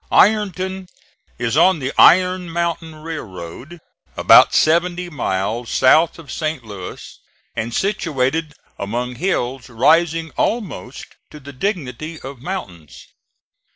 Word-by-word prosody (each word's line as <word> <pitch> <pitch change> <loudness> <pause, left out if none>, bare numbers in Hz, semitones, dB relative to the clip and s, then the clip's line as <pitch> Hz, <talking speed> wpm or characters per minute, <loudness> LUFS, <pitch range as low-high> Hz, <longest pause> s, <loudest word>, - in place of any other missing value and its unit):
Ironton 190 -2 +2 0.5
is 120 +1 -1
on 180 +3 +5
the 135 -2 -4
Iron 180 0 +5
Mountain 165 -1 -3
railroad, 135 - -8 0.4
about - - +6
seventy 175 +2 +2
miles 115 -3 -2
south 155 +6 +4
of 165 -4 -11
St. 155 -5 -3
Louis, 100 -5 -9 0.4
and 110 +1 -3
situated 160 - -1 0.2
among 120 +5 -3
hills 130 -8 -2
rising 160 +7 +2
almost 205 - -3 0.2
to 150 - -12
the 145 0 -11
dignity 155 - -4
of 135 -1 -9
mountains. 95 - -7
155 Hz, 110 wpm, -19 LUFS, 125-175 Hz, 0.5 s, about